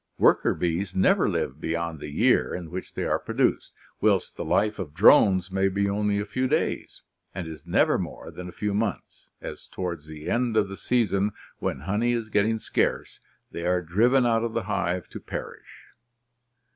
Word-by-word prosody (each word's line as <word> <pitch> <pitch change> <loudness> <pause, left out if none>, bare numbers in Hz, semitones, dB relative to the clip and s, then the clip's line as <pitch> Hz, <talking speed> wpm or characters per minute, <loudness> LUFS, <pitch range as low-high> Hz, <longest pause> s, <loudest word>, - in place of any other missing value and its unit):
Worker - - +4
bees 90 +2 -2
never 95 - +3
live 70 +4 -2
beyond 85 -1 -2
the 75 - -7
year 75 - +2
in 85 -3 -7
which 95 +1 -7
they - - -2
are - - +1
produced; - - 0 0.3
whilst - - +2
the - - -4
life 105 +1 +1
of 80 -5 -6
drones 95 +2 +5
may 95 +1 +2
be 100 +1 0
only 100 0 0
a 105 - -2
few 130 +5 -1
days, - - -2 0.3
and 90 -3 -4
is 80 0 -10
never 85 - +3
more - - -6
than 90 0 -8
a - - -8
few 105 +3 -2
months, 105 -1 -3
as - - -8
towards 85 -5 -5
the 75 0 -9
end 120 -2 +1
of 105 -2 +2
the 95 - -6
season, 105 0 +1 0.3
when 65 - -3
honey 105 +9 0
is 115 -2 -2
getting 105 +2 +2
scarce, - - -1 0.3
they 85 - -5
are 90 +1 +1
driven 120 +10 +3
out 115 -1 +2
of 115 -1 -2
the 115 - -1
hive 95 -3 -1
to - - -8
perish. - - -9
95 Hz, 185 wpm, -26 LUFS, 85-110 Hz, 0.3 s, drones